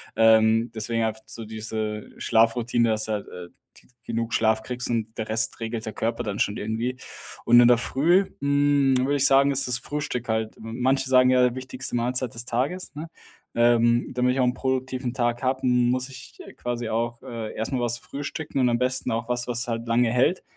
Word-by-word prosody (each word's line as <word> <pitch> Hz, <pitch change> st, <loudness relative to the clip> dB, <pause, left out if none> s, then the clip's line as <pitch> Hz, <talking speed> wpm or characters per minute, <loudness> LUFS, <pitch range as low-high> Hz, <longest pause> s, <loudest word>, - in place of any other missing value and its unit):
Ähm, 110 Hz, +1 st, +4 dB
deswegen 115 Hz, +1 st, -1 dB
einfach 110 Hz, 0 st, -3 dB
so 115 Hz, -, -8 dB
diese 110 Hz, -1 st, -4 dB
Schlafroutine, 115 Hz, +1 st, +2 dB
dass 110 Hz, 0 st, 0 dB
halt, 105 Hz, -2 st, -3 dB
äh, 90 Hz, -1 st, -9 dB, 0.3 s
g -, -, -21 dB, 0.2 s
genug 115 Hz, -1 st, -3 dB
Schlaf 110 Hz, -1 st, +2 dB
kriegst 125 Hz, +2 st, -5 dB
und 110 Hz, -1 st, -3 dB
der 110 Hz, -, -4 dB
Rest 110 Hz, 0 st, 0 dB
regelt 115 Hz, -1 st, -4 dB
der 110 Hz, -, -5 dB
Körper 115 Hz, +1 st, -2 dB
dann 105 Hz, -2 st, -4 dB
schon 105 Hz, +1 st, 0 dB
irgendwie. 115 Hz, +4 st, -3 dB, 0.5 s
Und 120 Hz, +1 st, +7 dB
in 120 Hz, -, +7 dB
der 120 Hz, -1 st, +5 dB
Früh, 170 Hz, +10 st, +2 dB
mm, 140 Hz, -1 st, +2 dB
würde 135 Hz, +3 st, +1 dB
ich 140 Hz, -1 st, +2 dB
sagen, 135 Hz, +1 st, +5 dB
ist 135 Hz, -1 st, 0 dB
das 125 Hz, -1 st, +1 dB
Frühstück 130 Hz, -3 st, -4 dB
halt 110 Hz, 0 st, -1 dB
manche 130 Hz, +4 st, -1 dB
sagen 130 Hz, 0 st, +5 dB
ja, 125 Hz, -1 st, +3 dB
wichtigste 130 Hz, 0 st, -5 dB
Mahlzeit 125 Hz, 0 st, -1 dB
des 115 Hz, +1 st, -3 dB
Tages, 135 Hz, +10 st, -2 dB
ne? 155 Hz, +2 st, -7 dB, 0.5 s
Ähm, 120 Hz, 0 st, +3 dB
damit 125 Hz, 0 st, +1 dB
ich -, -, -2 dB
auch -, -, +3 dB
'n 125 Hz, -, +1 dB
produktiven 130 Hz, -1 st, -2 dB
Tag 120 Hz, -2 st, 0 dB
habe, 130 Hz, 0 st, -1 dB
muss 125 Hz, 0 st, +2 dB
ich, 130 Hz, -2 st, -12 dB
äh, -, -, -12 dB
quasi 120 Hz, -1 st, -4 dB
auch, 115 Hz, +1 st, -2 dB
äh, 115 Hz, -2 st, -6 dB
erst 110 Hz, -, -3 dB
mal 130 Hz, -2 st, -1 dB
was 120 Hz, 0 st, 0 dB
frühstücken 140 Hz, +2 st, -5 dB
und 125 Hz, -1 st, +3 dB
am 120 Hz, -, +1 dB
besten 130 Hz, +1 st, 0 dB
auch 115 Hz, +1 st, -2 dB
was, 120 Hz, 0 st, -2 dB
was 120 Hz, 0 st, -2 dB
halt 115 Hz, 0 st, -3 dB
lange 115 Hz, 0 st, +2 dB
hält. 130 Hz, +9 st, +2 dB
120 Hz, 200 wpm, -24 LUFS, 115-130 Hz, 0.5 s, Und